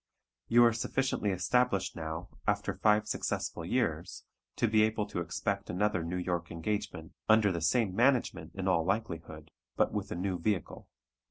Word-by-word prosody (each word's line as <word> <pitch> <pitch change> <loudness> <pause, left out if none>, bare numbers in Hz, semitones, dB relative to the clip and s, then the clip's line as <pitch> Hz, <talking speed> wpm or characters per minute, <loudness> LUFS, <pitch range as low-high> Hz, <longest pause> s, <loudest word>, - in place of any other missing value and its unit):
You 120 +1 +6
are 115 - +4
sufficiently 115 -1 -1
established 100 +3 +1
now, 80 +2 -5 0.2
after 100 -1 +1
five 105 +3 +2
successful - - -2
years, - - -1 0.3
to 120 - +1
be 110 0 +4
able 110 -1 +1
to 100 - -4
expect 100 +4 -2
another 95 -1 0
New 85 +2 -3
York 85 -2 -2
engagement, 100 +6 -4 0.2
under 110 -2 +5
the 85 -2 -3
same 95 +3 +2
management 125 +2 +2
in 95 -1 -3
all 85 -3 +3
likelihood 85 -6 -3 0.2
but - - +2
with 100 -2 -3
a - - -2
new 90 0 -2
vehicle. 100 -1 -2
100 Hz, 160 wpm, -31 LUFS, 85-110 Hz, 0.3 s, You